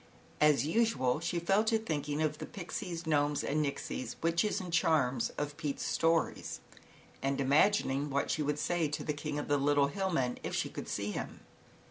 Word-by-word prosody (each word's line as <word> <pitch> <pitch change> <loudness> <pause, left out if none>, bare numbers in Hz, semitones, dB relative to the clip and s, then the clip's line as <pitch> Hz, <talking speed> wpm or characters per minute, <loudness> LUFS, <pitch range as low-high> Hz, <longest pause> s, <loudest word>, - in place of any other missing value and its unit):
As 150 -4 +4
usual 155 - +2
she 170 +1 -2
fell 195 +5 +3
to 225 0 +3
thinking 150 -7 -2
of 150 -1 -1
the - - -5
Pixies, 175 -1 -5
Gnomes 145 -2 +1
and 150 +2 0
Nixies, 140 -2 -4
Witches 170 +5 +2
and 180 -2 -6
Charms, 135 -8 +2
of 145 0 -3
Pete's 145 -2 -3
stories 165 0 0 0.6
and 135 0 0
imagining 145 0 +3
what 140 0 0
she 155 - 0
would 150 0 0
say 170 +1 0
to 145 - -4
the 150 - -1
King 145 0 -4
of 145 - -3
the 145 - +3
Little 140 0 +3
Hill 190 +4 -1
Men, 130 -8 0
if - - -4
she - - 0
could - - -7
see 100 0 -2
him. - - -5
150 Hz, 185 wpm, -32 LUFS, 140-170 Hz, 0.6 s, As